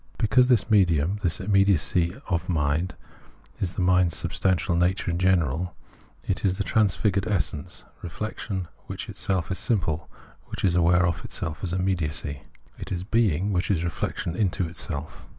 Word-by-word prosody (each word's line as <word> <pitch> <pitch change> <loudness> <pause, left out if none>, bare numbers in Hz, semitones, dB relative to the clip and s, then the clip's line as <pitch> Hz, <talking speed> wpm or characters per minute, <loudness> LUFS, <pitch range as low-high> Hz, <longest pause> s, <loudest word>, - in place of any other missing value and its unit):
Because 125 +3 +4
this 115 -3 +2
medium, 90 -2 +3
this 90 -3 +1
immediacy 95 -3 +2
of 90 -1 -1
mind, 80 +2 0 0.6
is 95 -1 -1
the 95 - -1
mind's 90 -3 +3
substantial 90 0 0
nature 90 +1 +1
in 85 - -2
general, 90 -2 +1 0.5
it - - -2
is 95 -1 +1
the 100 - 0
transfigured 100 -1 +1
essence, 90 -8 -2 0.2
re 90 - -5
flection 100 0 -4 0.2
which - - -6
itself 95 -2 -2
is 95 - -1
simple, 85 -8 -1 0.4
which - - -3
is 90 - +3
aware 90 +1 +4
of 85 -1 -1
itself 75 -2 -4
as 90 - -1
immediacy; 85 -6 -1 0.4
it - - -7
is 90 -1 -2
being, 100 -3 +1
which 90 0 0
is 90 -5 +1
reflection 85 0 -3
into 95 -3 +1
itself. 80 -2 -6
90 Hz, 155 wpm, -26 LUFS, 85-95 Hz, 0.6 s, Because